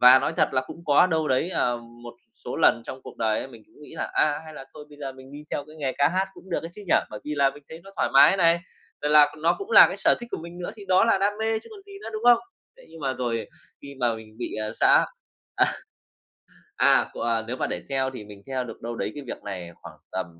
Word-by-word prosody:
Và 125 +1 +9
nói - - -1
thật - - +3
là 130 -1 +1
cũng 165 +2 -11
có 150 +4 +5
đâu 160 -3 0
đấy, 130 +7 +1
ờ, 120 -8 +1 0.3
một 120 0 -9 0.3
số - - -4
lần 115 - +4
trong 130 - -8
cuộc - - -11
đời 110 -1 +1
ấy 135 - -5
mình 115 -4 -14
cũng - - -20
nghĩ 150 - -12
là - - -4
"A, 145 -1 +2
hay 155 -1 -11
là 135 - -9
thôi 150 -1 -10
bây 145 - -16
giờ 135 -2 -5
mình 130 +1 -14
đi 145 +1 -9
theo 145 - -3
cái 155 +1 -14
nghề 140 -4 -2
ca 145 0 +5
hát 185 +3 0
cũng 190 - -15
được - - 0
đấy 165 - -7
chứ 210 - -10
nhỉ?" - - +3 0.2
Bởi 105 - -7
vì 150 - -3
là 140 -1 +3
mình 145 - -15
thấy 160 - -10
nó 195 - -12
thoải - - +1
mái 140 +7 +7
này, 170 -2 +4 0.4
rồi 150 - 0
là 150 0 +8
c 145 - -12
nó 160 +2 +2
cũng 400 +3 -7
là - - +10
cái - - -5
sở - - +3
thích 240 - -8
của - - -3
mình 170 +1 -10
nữa 175 - -4
thì 205 -2 -11
đó 185 +2 +5
là 230 -4 +3
đam 200 +1 +2
mê 220 0 0
chứ 220 - -15
còn 415 -2 -12
gì 400 - -13
nữa, - - -6
đúng 215 0 -5
không? 240 -1 +7 0.4
Thế - - -17
nhưng 165 - -13
mà 135 -2 -1
rồi 115 -4 -2 0.4
khi 140 0 -9
mà 120 -2 +2
mình 110 -1 -12
bị, 120 - -4
ờ, 110 0 -3
xã - - +5 0.5
à, - - +4 1.1
à, - - +4
c - - -11
à, 115 -1 0
nếu 125 +2 -4
mà - - -1
để - - -4
theo 135 -1 0
thì 125 -5 -8
mình 100 -1 -13
theo 130 -1 -2
được 120 - -10
đâu 120 0 -5
đấy - - -3
cái 145 - -7
việc - - -7
này 90 -4 -6
khoảng - - -11
tầm 95 - -2
145 Hz, 290 wpm, -25 LUFS, 125-170 Hz, 1.1 s, là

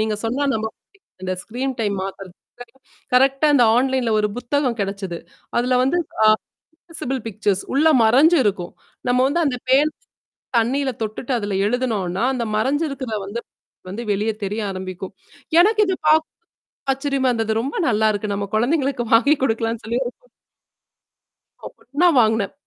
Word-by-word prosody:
நீங்கச் 215 -1 -1
சொன்னா 250 +6 -1
நம்ப 220 0 -2
மாட்டீங்க. 220 - -9 0.5
அந்த 185 - -1
ஸ்கிரீன் 255 +3 -4
டைம் 205 -2 0
மாத்துறது. 195 -1 -8 0.8
கரெக்டா 270 +3 +4
அந்த 250 - +5
ஆன்லைன்ல 260 -2 +1
ஒரு 210 - +1
புத்தகம் 255 -1 -1
கிடைச்சுது. 195 -3 -3 0.4
அதுல 250 +1 +2
வந்து, 270 +7 +1 0.7
ஆக்ஸசிபில் 320 -6 -6
பிக்சர்ஸ் 205 -2 -1
உள்ள 300 +4 +4 0.2
மறைஞ்சு 285 +10 +5
இருக்கும். 190 -4 -1 0.4
நம்ம 250 +1 +3 0.2
அந்தப் 250 -3 -2
பேன் 290 +4 +4 0.7
தண்ணீயில 265 +4 +1
தொட்டுட்டு 220 +4 -4
அதுல 205 -3 -2
எழுதுனோன்னா, 220 -7 -1
அந்த 240 - -2
மறைஞ்சிருக்கிற 275 +1 -1 0.2
வந்து, 230 +4 -4 0.5
வந்து 220 +5 -5
வெளிய 210 +3 0
தெரிய 205 +3 -3
ஆரம்பிக்கும். 185 0 -7 0.5
எனக்கு 425 +2 +3
இது 375 - 0
பாக்க 315 +1 +4 0.7
ஆச்சரியமா 270 -1 0
இருந்தது. 225 -2 -1
ரொம்ப 270 +5 -4
நல்லா 220 -2 +2
இருக்கு 205 0 -3
நம்ம 200 0 -2
குழந்தைகளுக்கு 265 +2 +1
வாங்கி 265 +6 +5
கொடுக்கலான்னு 225 -2 -1
சொல்லி 230 +2 -1
ஒரு 240 - -3 1.7
உடனே 290 +8 +1
வாங்குனேன். 220 -3 +2
235 Hz, 135 wpm, -21 LUFS, 210-270 Hz, 1.7 s, அந்த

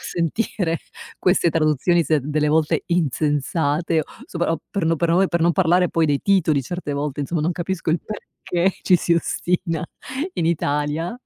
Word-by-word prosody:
sentire 170 0 -1 0.4
queste 180 -2 +3
traduzioni 160 +2 +2
se 155 +1 +2
delle 150 +1 0
volte 155 0 +2
insensate 155 0 0 0.2
sopra 170 -1 -1
o 165 - -3
per 200 -4 -1
no 165 +1 +2 0.2
me 195 - +4
per 170 - 0
non 170 +1 +4
parlare 180 0 +3
poi 165 0 +1
dei 145 -1 +1
titoli, 165 -8 +2
certe 175 0 -4
volte, 145 0 -3
insomma, 155 +3 -2
non 165 +4 0
capisco 175 0 -4
il 165 - +1
perché 190 -3 -2
ci 185 - +4
si 170 - 0
ostina 170 +1 -1 0.5
in 165 - 0
Italia 155 +5 -1
165 Hz, 160 wpm, -22 LUFS, 150-175 Hz, 0.5 s, me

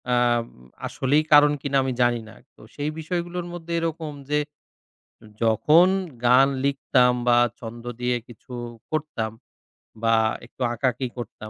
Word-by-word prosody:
আম 120 -1 +2 0.4
আসলেই 145 +4 +1
কারণ 145 0 +8
কিনা 140 -1 0
আমি 130 -1 -1
জানি 120 -1 +2
না। - - -14 0.2
তো - - -19
সেই 145 +1 -2
বিষয়গুলোর 175 +2 -3
মধ্যে 170 -1 -6
এরকম 165 -2 -3 0.2
যে 150 - +2 1.0
যখন 150 - +5 0.4
গান 130 +3 +6 0.2
লিখতাম 130 -3 +3 0.2
বা 120 - +6 0.2
ছন্দ 120 -1 -9 0.2
দিয়ে 125 0 +1
কিছু 120 +2 -14 0.4
করতাম 150 -8 -2 0.7
বা 115 0 +4 0.3
একটু 120 - -17
আঁকাআঁকি 125 +1 -1
করতাম। 110 -2 -7
130 Hz, 130 wpm, -24 LUFS, 120-150 Hz, 1.0 s, কারণ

